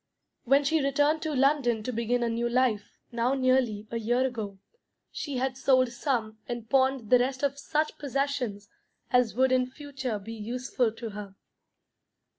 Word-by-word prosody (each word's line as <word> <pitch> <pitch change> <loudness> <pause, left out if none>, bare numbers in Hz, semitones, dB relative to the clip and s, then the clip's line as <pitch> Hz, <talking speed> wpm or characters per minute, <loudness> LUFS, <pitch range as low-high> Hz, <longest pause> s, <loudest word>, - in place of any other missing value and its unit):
When 275 +3 +4
she 315 +2 +2
returned 290 +3 +2
to 310 -2 -2
London 260 -5 +2
to 255 - -3
begin 235 +2 0
a 235 - +1
new 235 +1 -1
life, 240 -4 0
now 240 +3 +1
nearly 255 -5 +1
a 230 - -2
year 240 +3 +1
ago, 220 -6 -4 0.5
she 285 -4 -4
had 260 +1 -1
sold 260 -1 +3
some 240 -4 -2
and 240 -2 -5
pawned 265 -3 +1
the 250 - +7
rest 260 +2 -1
of 280 0 0
such 300 +2 -1
possessions 275 -7 -2 0.4
as 250 -4 +3
would 260 +1 +3
in 255 -1 +3
future 265 -5 -5
be 210 +3 -8
useful 240 +2 -1
to 230 -1 -7
her. 200 -1 -8
255 Hz, 165 wpm, -28 LUFS, 230-275 Hz, 0.5 s, the